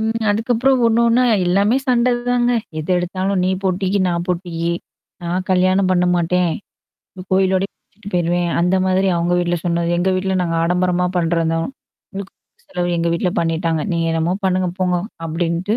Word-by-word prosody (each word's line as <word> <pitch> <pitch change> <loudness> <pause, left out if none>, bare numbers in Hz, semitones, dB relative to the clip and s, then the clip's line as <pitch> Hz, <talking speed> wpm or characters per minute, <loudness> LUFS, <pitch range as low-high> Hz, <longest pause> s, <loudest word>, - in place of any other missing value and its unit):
ம். 225 +1 -1
அதுக்கப்புறம் 240 +4 +1
ஒண்ணு, 230 0 +3
ஒண்ணா 245 +2 +3 0.2
எல்லாமே 200 +7 +3
சண்ட 250 0 +3 0.2
தாங்க. 245 0 +2 0.3
எது 155 +4 -4
எடுத்தாலும், 185 +2 -1
நீ 185 - +1
போட்டிக்கு, 190 +1 0
நான் 175 0 -1
போட்டிக்கு. 170 -1 -2 0.5
"நான் 180 +2 -2
கல்யாணம் 185 +1 +3
பண்ண 180 -1 +3
மாட்டேன். 175 0 +1 0.8
கோயிலோடயே 190 +1 +2
பிச்சிட்டு 205 -1 -14
போயிருவேன்." 175 0 +1
அந்த 180 +2 +2
மாதிரி 190 +1 +2
அவங்க 170 +1 0
வீட்ல 175 0 0
சொன்னாரு. 170 -1 0
"எங்க 190 +2 +1
வீட்ல 190 0 -1
நாங்க 165 -1 -1
ஆடம்பரமா 180 +1 +1
பண்றோம் 165 -1 +1
தான். 165 - -1 0.5
முழுக்க 195 0 -6
முழுக்க 475 - -38
செலவு, 180 -1 -2
எங்க 170 - 0
வீட்ல 180 +2 0
பண்ணிட்டாங்க. 165 -1 0
நீங்க 165 0 0
என்னமோ 165 +3 0
பண்ணுங்க 185 -1 +1
போங்க." 180 -1 +1 0.3
அப்டின்ட்டு. 170 +6 -1
180 Hz, 160 wpm, -19 LUFS, 170-195 Hz, 0.8 s, ஒண்ணு